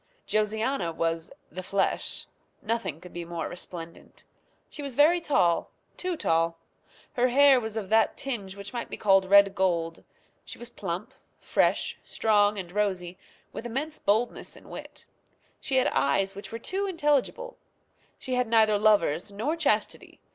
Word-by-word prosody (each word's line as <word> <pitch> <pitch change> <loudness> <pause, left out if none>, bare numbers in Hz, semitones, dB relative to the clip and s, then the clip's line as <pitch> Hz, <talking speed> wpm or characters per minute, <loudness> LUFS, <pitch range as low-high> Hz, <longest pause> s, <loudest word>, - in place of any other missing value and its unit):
Josiana 215 -2 0
was 165 0 -2 0.2
"the 185 +4 -6
flesh." 195 +2 -1 0.4
Nothing 210 -8 -2
could 180 +1 -13
be 175 - -5
more 170 -1 -4
resplendent. 170 -1 -9 0.4
She 295 - -8
was 280 -3 -5
very 325 +5 +5
tall 180 - +2 0.3
too 365 -2 -3
tall. 165 - +1 0.6
Her 245 0 +2
hair 270 +1 +6
was 220 -1 -5
of 200 -4 -4
that 220 0 +3
tinge 210 -8 -4
which 200 +2 -8
might 240 -1 -4
be - - -6
called 195 -2 +4
red 200 0 +6
gold. 170 -4 0 0.4
She - - -9
was 240 0 -9
plump, 195 +6 -5 0.3
fresh, - - +1
strong, 210 -1 +2
and 180 -3 -6
rosy, 185 -3 -2 0.3
with 240 - -5
immense 285 +6 -4
boldness 220 +4 0
and - - -15
wit. - - -9 0.5
She 270 - -3
had 260 - +4
eyes 195 +8 +1
which 200 +1 -9
were 230 - -4
too 385 - -2
intelligible. 335 - 0 0.6
She 260 - -5
had 250 -1 +1
neither 220 -2 +4
lovers 200 -4 +3
nor 225 +11 -2
chastity. 335 - -1
210 Hz, 155 wpm, -27 LUFS, 180-250 Hz, 0.6 s, hair